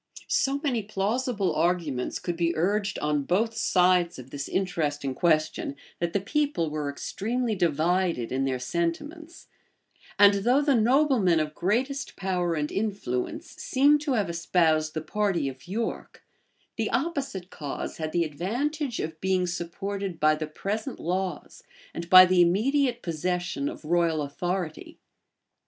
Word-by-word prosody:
So 275 +1 +1
many 250 -6 +1
plausible 210 +1 -1
arguments 160 -6 0
could 175 - -4
be 170 0 0
urged 200 +5 0
on 150 -1 0
both 205 +10 0
sides 180 -4 +2
of 130 0 -11
this 140 0 -5
interesting 150 -7 -1
question, 155 -2 +1 0.2
that 170 -1 -1
the 200 - +2
people 225 - -1
were 150 -1 -2
extremely 225 - -2
divided 170 - +1
in 135 +1 0
their 130 -1 0
sentiments; 170 - -4 0.7
and 205 0 +7
though 250 +5 +4
the 285 -1 +3
noblemen 240 - +3
of 155 -1 -2
greatest 255 - -1
power 180 -3 -1
and 150 -1 -2
influence 195 - -3
seem 285 +3 +3
to 290 -2 -1
have 215 -5 +1
espoused 165 -2 +1
the 155 - -1
party 195 -6 0
of 130 +2 -8
York, 220 +5 -4 0.5
the 225 -1 0
opposite 270 - -2
cause 145 -3 -5
had 155 -1 -3
the 170 +1 +2
advantage 240 - -2
of 160 0 -5
being 185 -1 +1
supported 180 +1 -4
by 155 0 +4
the 155 0 -3
present 210 - -4
laws, 180 -1 -3 0.3
and 170 0 -6
by 185 0 +11
the 185 -1 +4
immediate 240 +8 +2
possession 175 -3 -2
of - - -10
royal 165 -2 +2
authority. 175 +3 -4
180 Hz, 145 wpm, -27 LUFS, 155-220 Hz, 0.7 s, by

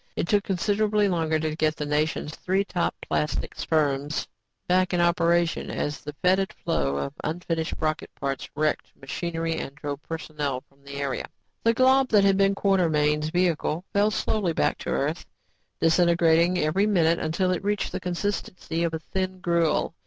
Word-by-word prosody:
It - - -1
took 205 +1 +3
considerably 205 +2 +1
longer 165 -4 +1
to 155 0 -2
get 155 -1 +1
the 150 - -4
nation's 150 +1 -1
three 190 +2 0
top 175 -3 -1
plastics 150 - -2
firms 145 -2 0 0.4
back 185 0 +2
in - - +1
operation 170 0 +2
as 145 0 -3
the 150 - -7
fetid 190 +1 +3
flow 70 0 -1
of 70 0 -3
unfinished 165 0 -2
rocket 155 -1 -1
parts 135 -2 -3
wrecked 155 +1 -1
machinery 165 +3 -3
and 135 - -6
drove 145 -1 -5
personnel 150 -5 -4
from 140 0 -29
the 140 0 -9
area. 140 -2 -3 0.4
The 230 0 +3
glob 260 +1 +5
that 210 -4 +4
had 195 -1 +4
been 195 0 +3
Quartermain's 155 -6 +2
vehicle 175 -1 0
fell 205 +1 +4
slowly 210 -4 0
back - - +1
to - - -5
Earth, - - -1 0.6
disintegrating 170 +1 +4
every 180 +6 +2
minute 170 -5 +3
until 175 +4 0
it 180 - -2
reached 205 0 -1
the - - -3
consistency 180 -2 -3
of 165 -1 -1
thin 185 -1 -1
gruel. 170 -2 +1
170 Hz, 160 wpm, -26 LUFS, 155-185 Hz, 0.6 s, glob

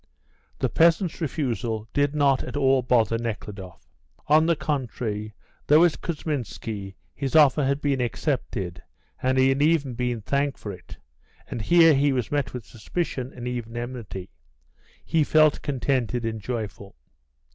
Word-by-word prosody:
The - - 0
peasants' 170 +1 +2
refusal 120 -7 -2
did 145 +1 +1
not 140 -3 +3
at 125 +3 -5
all 135 -2 +3
bother 115 -2 +2
Nekhludoff. 105 -5 -6 0.4
On 155 +2 +4
the 170 - +3
contrary, 120 -7 -3 0.3
though 155 +3 +6
at 170 - 0
Kousminski 115 - -4 0.2
his 135 +1 -3
offer 150 -1 +6
had 140 +1 0
been 140 -3 0
accepted 120 - -2 0.4
and 130 +1 +1
he 130 0 +5
had 135 +1 +1
even 150 -4 +2
been 120 -1 -2
thanked 140 +5 -1
for 105 - -6
it, 90 - -12 0.5
and 115 - -5
here 165 +6 +6
he 140 0 +3
was 125 -4 -2
met 145 -3 0
with 125 -4 -7
suspicion 130 +2 -4
and 125 0 -7
even 120 -2 -4
enmity, 120 - -6 0.7
he 160 -2 +2
felt 155 0 +4
contented 125 -4 -1
and 110 -1 -3
joyful. 105 -3 -5
130 Hz, 145 wpm, -25 LUFS, 115-145 Hz, 0.7 s, though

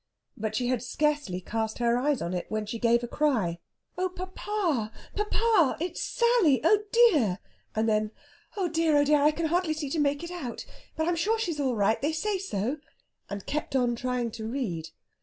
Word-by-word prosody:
But 220 0 -3
she 245 - 0
had 245 -2 0
scarcely 270 -7 -1
cast 220 +3 -3
her 235 -1 +2
eyes 275 +2 +1
on 170 - -3
it 180 - -3
when 215 0 -2
she 230 +2 -5
gave 235 0 +3
a - - -2
cry. 230 - 0 0.4
"Oh, 370 0 +1
papa, 365 - -2 0.2
papa; 420 - +2
it's 350 +1 -3
Sally! 470 - +3
Oh 410 +6 +5
dear!" 315 - +5 0.4
And 220 +1 +1
then: 215 -1 +2 0.5
"Oh 380 -3 +1
dear, 325 -2 +2
oh 290 - +5
dear! 295 0 +4
I 295 - +6
can 325 +2 -2
hardly 340 0 +1
see 295 -3 -4
to 320 - 0
make 285 +1 +1
it 340 - -6
out. 290 -10 -5 0.3
But 315 +1 -1
I'm 350 - +2
sure 425 +7 +1
she's 345 -9 -2
all 265 -4 +1
right! 210 +1 +2
They 300 +3 0
say 390 +5 -1
so." 255 - -2 0.5
And 200 -1 -6
kept 295 -2 -3
on 245 -2 +2
trying 245 -1 -2
to 220 0 -6
read. 205 - -3
285 Hz, 195 wpm, -28 LUFS, 225-340 Hz, 0.5 s, I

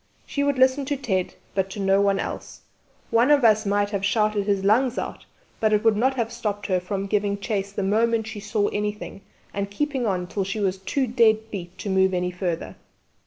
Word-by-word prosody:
She 285 - -2
would 285 -1 +1
listen 260 +2 +4
to 285 +1 -1
Ted, 190 -9 -2 0.2
but 190 -1 0
to 200 - -7
no 195 0 +3
one 200 -1 +2
else; - - -5 0.5
one 235 +4 +4
of 285 -4 +5
us 215 -1 +4
might 205 0 +1
have 200 -2 -2
shouted 210 0 +1
his 200 -2 +1
lungs 235 +5 +3
out, - - -5 0.3
but 215 -1 +2
it 210 - +2
would 225 -2 +4
not 260 +5 +2
have 230 -2 -1
stopped 205 -3 -3
her 185 -2 +1
from 195 +2 -3
giving 200 0 0
chase 200 -1 -3
the 200 - -3
moment 225 +3 +2
she 220 -1 -6
saw 210 0 0
anything 210 -1 -4 0.3
and 200 0 -2
keeping 265 +2 -1
on 180 -3 -1
till 195 +2 -2
she 195 +3 -3
was 190 -2 0
too 260 +8 -1
dead 225 -2 +2
beat 180 -3 -7
to 205 - -5
move 190 0 +3
any 180 0 -1
further. 180 -2 -4
205 Hz, 215 wpm, -24 LUFS, 195-230 Hz, 0.5 s, of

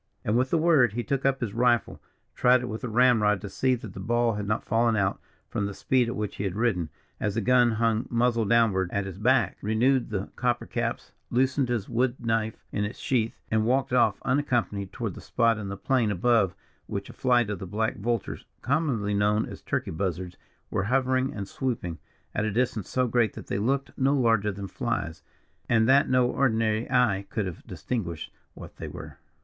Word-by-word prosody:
And 105 - +1
with 130 +2 +2
the 165 - +2
word, 155 -9 +4
he 120 +1 -2
took 135 +1 0
up 135 0 0
his 110 -5 -2
rifle, 120 0 +1 0.3
tried 125 0 +4
it - - -3
with 110 0 -5
the 125 - -4
ramrod 110 -4 +4
to 100 - -6
see 130 +4 +1
that 115 -5 -9
the 95 - -8
ball 120 +3 +1
had 105 -1 -4
not 105 +2 -1
fallen 115 0 +2
out, 100 -2 0 0.3
from 100 - -2
the 100 - -6
speed 125 -2 +1
at 120 - -3
which 105 -1 -4
he - - -3
had 95 -2 -2
ridden, 100 -8 0 0.3
as 105 - -1
the 115 - +1
gun 120 +1 +4
hung 115 +1 +1
muzzle 120 -1 +2
downward 105 -5 +3
at 100 0 -1
his 95 -1 -7
back; 120 -3 +2
renewed 120 +5 +2
the 100 -2 -3
copper 120 -1 0
caps, - - -3 0.2
loosened 130 +1 +1
his 115 -5 -1
wood 125 +1 +1
knife 115 -1 -2
in 105 - -1
its 105 +3 -4
sheath, 115 -4 -1
and 110 0 +2
walked 125 +2 +1
off 115 -5 +3
unaccompanied 120 -8 0
toward - - -4
the - - -10
spot 115 -2 +1
in 100 - -5
the 100 0 -5
plain 120 +1 +1
above 105 -1 +2 0.3
which 100 0 -4
a - - -11
flight 120 -4 +2
of 100 - -4
the 95 - -6
black 110 +6 -1
vultures, 115 +1 -3 0.2
commonly 130 -8 0
known 105 +2 +2
as - - -9
Turkey - - -2
Buzzards, 90 0 -3 0.4
were 95 - 0
hovering 130 +2 +1
and 100 -2 -5
swooping, 110 -11 -3 0.3
at 105 - 0
a 110 - 0
distance 115 -2 -1
so 130 0 +1
great 120 -2 +2
that - - -9
they 100 - -2
looked 135 +5 -1
no 135 +2 +3
larger 115 -5 +2
than 100 0 -6
flies, 80 -3 -3 0.5
and 110 -1 +4
that 135 +2 +5
no 125 -1 +4
ordinary 115 -4 +1
eye 120 -6 +2
could 110 -3 -2
have 90 -3 -6
distinguished 85 -10 -4 0.2
what - - -11
they - - -6
were. - - -9
115 Hz, 205 wpm, -27 LUFS, 105-125 Hz, 0.5 s, that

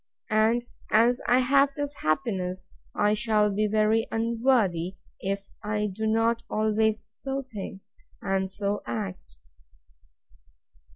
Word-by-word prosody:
And, 225 +3 +3 0.2
as 235 +3 +4
I 250 +1 +5
have 275 +2 +3
this 290 -1 -4
happiness, 185 +1 -1 0.3
I 210 0 +3
shall 215 -1 +2
be 210 +2 +1
very 215 +2 +2
unworthy, 225 -6 +1 0.2
if 195 +1 -3
I 210 0 -1
do 220 +3 -2
not 225 +1 +2
always 215 0 +1
so 270 +5 -4
think, 205 -5 -7 0.4
and 195 -1 -1
so 205 +1 -2
act. 95 - -5
215 Hz, 115 wpm, -27 LUFS, 195-230 Hz, 0.4 s, I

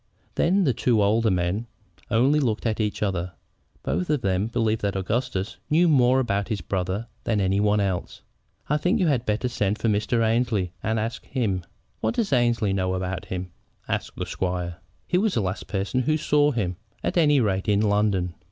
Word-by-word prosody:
Then 190 +4 +2
the 135 -7 +2
two 115 0 +2
older 110 +3 +3
men 90 +5 0 0.4
only 130 +6 +3
looked 115 -6 -1
at 110 -1 0
each 105 -1 -1
other. 90 -3 -2 0.5
Both 85 +7 -1
of 150 -4 +1
them 95 0 0
believed 115 -2 0
that 100 -1 -1
Augustus 105 +1 -2
knew 170 +4 +4
more 130 -4 +4
about 100 -6 0
his 110 -4 -2
brother 95 +5 -2 0.2
than 110 -3 0
any 95 0 +1
one 105 0 +3
else. 95 -3 -2 0.4
"I 150 - +2
think 180 +9 +1
you 185 - +3
had 130 -6 +1
better 110 +4 0
send 105 -4 0
to 110 - -1
Mr. 110 +2 +1
Annesley 110 -5 +1
and 110 +1 0
ask 115 +3 -3
him." 105 -9 -1 0.4
"What - - -1
does 225 - 0
Annesley 120 -5 +2
know 95 -1 0
about 95 0 -3
him?" 90 -1 -5 0.4
asked - - -3
the - - -2
squire. 90 -2 -3 0.3
"He 180 - +1
was 215 0 +1
the 115 - +2
last 95 0 -3
person 100 +6 -1
who 155 +5 +1
saw 150 -1 +3
him, 100 -10 -2 0.3
at - - -1
any 150 -5 +4
rate, 100 -4 0
in 100 0 +3
London." 100 -4 +1
110 Hz, 190 wpm, -25 LUFS, 95-125 Hz, 0.5 s, knew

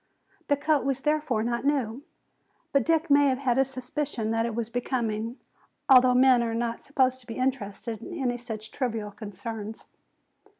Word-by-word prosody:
The 285 - +3
coat 295 0 +2
was 270 -1 -1
therefore 300 -7 +1
not 235 +1 -1
new. 270 -4 0 0.7
But 275 -3 +3
Dick 325 -2 +2
may 285 0 +6
have 260 -1 +2
had 260 -2 +1
a - - +6
suspicion 255 -3 -3
that 225 +1 +1
it 230 - -4
was 235 -1 -2
becoming, 235 -1 -2 0.5
although 255 -1 +7
men 255 -1 +6
are 230 -1 -1
not 235 0 -2
supposed 260 -2 +1
to 250 - -20
be 225 - -6
interested 230 -4 -2
in 360 -2 -7
any 245 -2 0
such 220 -3 -7
trivial 225 -6 -2
concerns. 215 +1 -7
245 Hz, 170 wpm, -27 LUFS, 225-270 Hz, 0.7 s, although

